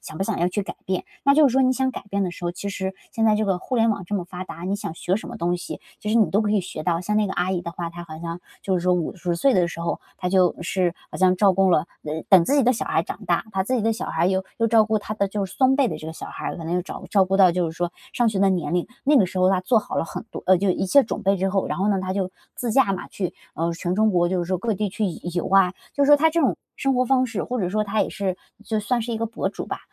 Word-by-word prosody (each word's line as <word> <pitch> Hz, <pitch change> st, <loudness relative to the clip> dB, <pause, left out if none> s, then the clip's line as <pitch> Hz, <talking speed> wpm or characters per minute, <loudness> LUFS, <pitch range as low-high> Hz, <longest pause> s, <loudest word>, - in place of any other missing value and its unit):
想 155 Hz, -, -9 dB
不 -, -, 0 dB
想 -, -, -2 dB
要 175 Hz, -, +2 dB
去 205 Hz, +3 st, -2 dB
改 -, -, -7 dB
变。 185 Hz, -1 st, -1 dB, 0.2 s
那 280 Hz, -, +5 dB
就 300 Hz, -1 st, +6 dB
是 240 Hz, -, -3 dB
说 265 Hz, -, +4 dB
你 255 Hz, 0 st, +4 dB
想 260 Hz, 0 st, 0 dB
改 225 Hz, -, -8 dB
变 200 Hz, 0 st, 0 dB
的 185 Hz, -, -1 dB
时 175 Hz, -, -9 dB
候， 175 Hz, -, -1 dB
其 200 Hz, +3 st, -5 dB
实 190 Hz, -1 st, -3 dB, 0.2 s
现 225 Hz, -, -1 dB
在 215 Hz, -, +5 dB
这 215 Hz, -, +1 dB
个 190 Hz, -2 st, +1 dB
互 255 Hz, -, -5 dB
联 230 Hz, 0 st, +4 dB
网 200 Hz, -3 st, -1 dB
这 205 Hz, -, -4 dB
么 190 Hz, -, 0 dB
发 180 Hz, 0 st, -7 dB
达， 170 Hz, -, -9 dB
你 195 Hz, +2 st, -1 dB
想 200 Hz, -, -5 dB
学 185 Hz, +3 st, -1 dB
什 -, -, -7 dB
么 -, -, -7 dB
东 175 Hz, +1 st, 0 dB
西， 175 Hz, -, -7 dB, 0.2 s
就 210 Hz, -, -4 dB
是 230 Hz, -, +3 dB
你 220 Hz, -, +4 dB
都 205 Hz, +3 st, +2 dB
可 210 Hz, -, 0 dB
以 210 Hz, -2 st, +3 dB
学 170 Hz, -3 st, -6 dB
到。 170 Hz, 0 st, 0 dB
像 210 Hz, +4 st, -1 dB
那 215 Hz, -, +3 dB
个 190 Hz, -, -3 dB
阿 180 Hz, +1 st, 0 dB
姨 180 Hz, -2 st, -1 dB
的 170 Hz, 0 st, -6 dB
话， 170 Hz, -1 st, -4 dB
她 175 Hz, +1 st, -9 dB
好 155 Hz, -1 st, -9 dB
像 170 Hz, 0 st, -5 dB, 0.2 s
就 190 Hz, -, 0 dB
是 -, -, -3 dB
说 180 Hz, 0 st, +3 dB
50 175 Hz, +1 st, -2 dB
岁 265 Hz, +9 st, +3 dB
的 180 Hz, -2 st, +3 dB
时 170 Hz, -, -7 dB
候， 170 Hz, -, -2 dB, 0.2 s
她 180 Hz, -, -2 dB
就 180 Hz, -1 st, +3 dB
是 175 Hz, 0 st, 0 dB, 0.2 s
好 -, -, -6 dB
像 185 Hz, -1 st, +4 dB
照 195 Hz, -1 st, +5 dB
顾 190 Hz, 0 st, +3 dB
了 165 Hz, -1 st, +3 dB, 0.2 s
呃， 155 Hz, +1 st, -4 dB
等 185 Hz, -3 st, +7 dB
自 280 Hz, -, +1 dB
己 285 Hz, -, +4 dB
的 250 Hz, -, +4 dB
小 230 Hz, -, -3 dB
孩 -, -, +1 dB
长 -, -, -7 dB
大， -, -, +2 dB
她 195 Hz, -2 st, 0 dB
自 255 Hz, +6 st, 0 dB
己 240 Hz, -, +1 dB
的 225 Hz, +1 st, +2 dB
小 -, -, -5 dB
孩 165 Hz, -, 0 dB
儿 -, -, +4 dB
又 190 Hz, 0 st, 0 dB
又 230 Hz, -, +3 dB
照 220 Hz, -1 st, +5 dB
顾 220 Hz, 0 st, +1 dB
她 210 Hz, +1 st, -5 dB
的 200 Hz, -2 st, +1 dB
就 200 Hz, 0 st, -2 dB
是 -, -, -12 dB
孙 265 Hz, 0 st, +4 dB
辈 270 Hz, -4 st, +3 dB
的 -, -, -4 dB
这 155 Hz, -, -9 dB
个 160 Hz, -, -5 dB
小 -, -, -8 dB
孩 -, -, -8 dB
儿， -, -, -3 dB
可 165 Hz, -, -7 dB
能 165 Hz, +2 st, -2 dB
又 180 Hz, -, +1 dB
找 190 Hz, -, -8 dB
照 195 Hz, -2 st, +5 dB
顾 190 Hz, +1 st, -1 dB
到 190 Hz, -2 st, +7 dB
就 175 Hz, -1 st, 0 dB
是 -, -, -11 dB
说 175 Hz, -1 st, -1 dB, 0.2 s
上 240 Hz, -1 st, +2 dB
学 210 Hz, -3 st, -1 dB
的 195 Hz, 0 st, +4 dB
年 175 Hz, -3 st, -1 dB
龄， 175 Hz, -, 0 dB, 0.2 s
那 290 Hz, +1 st, +5 dB
个 205 Hz, -, +5 dB
时 185 Hz, +1 st, -5 dB
候 185 Hz, -, +4 dB
她 190 Hz, -, +2 dB
做 230 Hz, +4 st, +3 dB
好 210 Hz, -, -5 dB
了 -, -, +1 dB
很 -, -, -6 dB
多 -, -, -7 dB
呃， 185 Hz, 0 st, +6 dB
就 200 Hz, -, +1 dB
一 185 Hz, -, 0 dB
切 280 Hz, +8 st, +6 dB
准 215 Hz, -1 st, -4 dB
备 195 Hz, 0 st, +3 dB
之 190 Hz, +1 st, 0 dB
后， 195 Hz, 0 st, 0 dB
然 -, -, -3 dB
后 195 Hz, +2 st, +1 dB
呢， 200 Hz, -, +2 dB
她 185 Hz, 0 st, -3 dB
就 190 Hz, -1 st, -1 dB, 0.2 s
自 240 Hz, -, -3 dB
驾 230 Hz, -3 st, +3 dB
嘛， 190 Hz, -, -5 dB
去， 185 Hz, -4 st, -3 dB, 0.2 s
呃， 170 Hz, +1 st, -1 dB
全 175 Hz, +2 st, -2 dB
中 215 Hz, +1 st, +3 dB
国 175 Hz, -2 st, +2 dB
就 185 Hz, 0 st, 0 dB
是 175 Hz, -, 0 dB
说 185 Hz, 0 st, -1 dB
各 225 Hz, +2 st, -1 dB
地 205 Hz, +1 st, -1 dB
去 215 Hz, +3 st, -2 dB
游 170 Hz, -4 st, -5 dB
游 175 Hz, -, -1 dB
啊。 190 Hz, -1 st, +5 dB, 0.2 s
就 285 Hz, -, +3 dB
是 -, -, +2 dB
说 290 Hz, -, +9 dB
她 320 Hz, +2 st, +4 dB
这 335 Hz, -, +1 dB
种 275 Hz, -, +3 dB, 0.2 s
生 270 Hz, -, +1 dB
活 255 Hz, -, +2 dB
方 255 Hz, 0 st, +3 dB
式， 230 Hz, -6 st, -3 dB
或 250 Hz, 0 st, -3 dB
者 180 Hz, -2 st, -1 dB
说 215 Hz, +2 st, +1 dB
她 210 Hz, +1 st, 0 dB
也 -, -, -2 dB
是 190 Hz, -3 st, -2 dB, 0.3 s
就 220 Hz, -1 st, -1 dB
算 240 Hz, +3 st, 0 dB
是 235 Hz, +1 st, -4 dB
一 225 Hz, -, -1 dB
个 230 Hz, -, -1 dB
博 230 Hz, -, -2 dB
主 -, -, -6 dB
吧， -, -, -4 dB
195 Hz, 365 characters per minute, -23 LUFS, 180-220 Hz, 0.3 s, 说